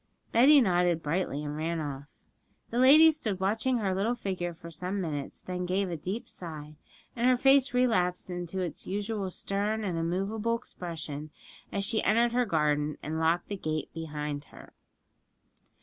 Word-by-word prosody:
Betty 275 +5 +7
nodded 175 -5 +2
brightly, 150 -2 -1
and 145 0 -4
ran 165 +2 -2
off. 140 -2 -5 0.7
The 235 - 0
lady 305 +5 +8
stood 220 -11 -3
watching 220 +6 +1
her 200 -4 0
little 210 +6 0
figure 185 -6 -3
for 170 0 -11
some 180 +5 -3
minutes, 150 -6 -4
then 180 -1 -4
she 180 - -2
gave 190 0 0
a - - -2
deep 185 +9 -5
sigh, 155 -4 -8 0.4
and 240 +1 +1
her 255 -1 +5
face 270 +1 +5
relapsed 220 -8 +1
into 175 +1 -5
its 175 -3 -5
usual 205 0 -2
stern 205 +4 -2
and 180 -5 -2
immovable 200 +7 -1
expression 160 - -6 0.4
as 200 - -1
she 220 +1 +2
entered 230 +3 +3
her 245 +1 +2
garden 150 -3 +1
and 160 +2 -3
locked 165 +2 +1
the 205 - -3
gate 155 -3 -3
behind 150 -2 -4
her. - - -15
185 Hz, 165 wpm, -29 LUFS, 160-220 Hz, 0.7 s, lady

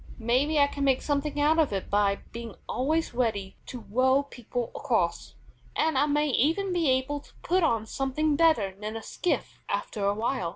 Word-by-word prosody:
Maybe 255 +7 +1
I 285 - +6
can 285 0 -4
make 270 -2 +2
something 290 0 -1
out 305 +3 +3
of 310 -7 +3
it 195 -2 -3
by 200 -1 +2
being 230 -2 -7
always 310 +4 0
ready 215 -6 -1
to 245 - -7
row 260 +5 +3
people 245 -3 -5
across, - - -1 0.4
and 315 -2 +1
I 285 +3 +3
may 295 +1 +1
even 330 +9 +1
be 335 -5 +2
able 260 +3 +1
to - - -21
put 370 +2 +2
on 230 -9 +1
something 275 +6 0
better 280 - +3
than 210 +2 -6
a 225 - -8
skiff 355 - -2
after 210 - -2
awhile. 205 -1 0
265 Hz, 180 wpm, -27 LUFS, 225-300 Hz, 0.4 s, I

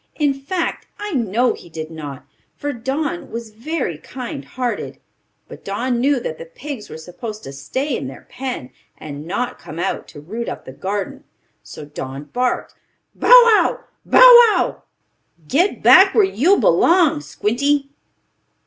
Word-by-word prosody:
In 290 -3 +1
fact 290 +6 -4
I 415 0 -5
know 235 -1 +1
he - - -13
did 160 0 -7
not, 145 -4 -8 0.3
for 290 0 -3
Don 285 +8 -3
was 230 -1 -7
very 230 - -4
kind 245 - -7
hearted. 245 - -4 0.5
But - - -12
Don 235 +5 -2
knew 275 +2 +2
that 160 -9 -6
the - - -7
pigs 250 - -8
were - - -8
supposed 210 +7 -8
to 135 - -8
stay 255 - -3
in 130 - -4
their 135 - -11
pen, 250 - -6 0.3
and 150 +1 -8
not 245 +7 -3
come 155 - -10
out 170 - -3
to - - -12
root 220 +11 -5
up - - -7
the - - -9
garden. 195 +6 -4 0.4
So - - -10
Don 140 -1 -7
barked: 245 +11 -2 0.4
"Bow - - -4
wow! 475 -3 +6 0.2
Bow - - +4 0.3
wow! - - -1 0.7
Get 350 - +1
back 385 +1 +7
where 435 - +6
you 385 - +3
belong, 330 -4 +3
Squinty." 280 +6 -1
245 Hz, 155 wpm, -19 LUFS, -, 0.7 s, back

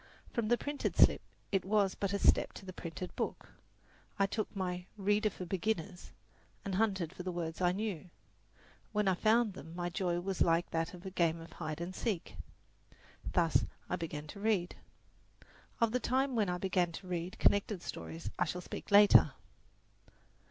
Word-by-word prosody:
From 235 -3 0
the 240 +2 +4
printed 290 +2 -2
slip - - +6 0.3
it 195 -2 +2
was 200 -1 +2
but 200 -1 -2
a 200 - +1
step - - +4
to 195 - -10
the 185 - -7
printed 170 +1 -6
book. - - -3 0.7
I 200 - +4
took 215 +2 -2
my 180 -1 -3
"Reader 205 +2 +2
for 185 -2 -7
Beginners" 185 0 -2 0.5
and 195 - -2
hunted 190 -4 +1
for 185 - -7
the 185 0 -3
words 170 -1 -4
I 180 -1 +4
knew; 190 -3 -3 0.8
when 210 -1 +1
I 190 - +5
found 220 +3 +3
them 165 -2 -10
my 175 0 -2
joy 175 -1 0
was 190 +1 -3
like 165 +1 +3
that 165 +3 -1
of 180 +2 -13
a 190 - -5
game 170 -3 +1
of 165 0 -11
hide 155 -2 -5
and 175 +2 -4
seek. 190 - -3 1.0
Thus 165 -2 +3 0.3
I - - +2
began 155 -4 -5
to 200 - -8
read. 200 -4 +1 1.0
Of 230 -1 +3
the 250 - +1
time 260 +1 +1
when 210 -4 +2
I 180 - 0
began 180 -2 +1
to 190 - -8
read 175 0 -3
connected 200 -2 +2
stories 165 +1 -6
I - - +3
shall 180 - -3
speak - - -7
later. 205 0 +7
185 Hz, 180 wpm, -33 LUFS, 175-205 Hz, 1.0 s, later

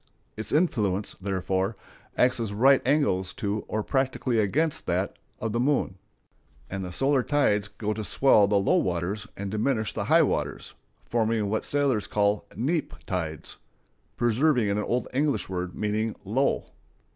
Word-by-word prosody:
Its 110 - -4
influence, 105 - +1
therefore, 95 +1 -1 0.4
acts 125 -1 +3
at 115 -2 -2
right 130 +7 +4
angles 115 -11 +1
to 105 +1 -2
or 110 0 -2
practically 130 -2 0
against 145 +10 0
that - - -1 0.2
of 110 - -2
the 120 - -1
moon, 135 -5 +1 0.8
and 95 0 -3
the 90 - -5
solar 135 +7 +2
tides 105 -8 +1
go 105 +1 -3
to 110 +1 -4
swell 105 -2 +4
the 100 0 +2
low 100 - +3
waters 90 +5 -1
and 100 0 -4
diminish 110 -1 0
the - - -3
high - - +5
waters, - - -2 0.3
forming 115 -2 0
what 110 - -1
sailors 140 -7 +1
call 105 0 +1
neap 150 +7 -1
tides,—preserving 110 - -2
an 100 - 0
old 120 +4 -1
English 145 +1 0
word 90 -1 -4
meaning 105 +1 -1
low. 130 +8 +1
110 Hz, 145 wpm, -26 LUFS, 100-130 Hz, 0.8 s, high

